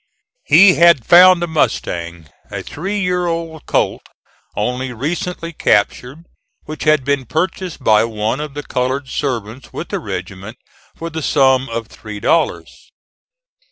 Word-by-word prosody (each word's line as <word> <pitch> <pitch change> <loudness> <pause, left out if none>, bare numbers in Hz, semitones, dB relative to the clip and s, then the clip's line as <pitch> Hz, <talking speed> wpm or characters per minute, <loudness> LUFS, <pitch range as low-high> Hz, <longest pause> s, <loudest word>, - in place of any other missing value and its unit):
He 195 -2 +7
had 170 -8 +4
found 180 0 +7
a - - -1
mustang, 85 - -2 0.2
a - - -6
three 195 +7 -4
year 180 -2 0
old 165 -2 -5
colt - - 0 0.5
only 125 +4 -2
recently 165 +6 -4
captured, 125 +6 0 0.4
which 155 0 -7
had 155 -4 +3
been 140 -3 -1
purchased 175 0 -3
by 110 -1 +4
one 110 +3 -2
of 150 -2 -6
the 145 - -5
colored 130 +1 -2
servants 125 -3 -4
with - - -7
the - - -2
regiment 100 +5 -7 0.4
for 165 0 -6
the 160 0 -4
sum 135 -3 +2
of 115 0 -4
three 105 -1 -10
dollars. 165 +10 -1
140 Hz, 140 wpm, -17 LUFS, 115-165 Hz, 0.5 s, He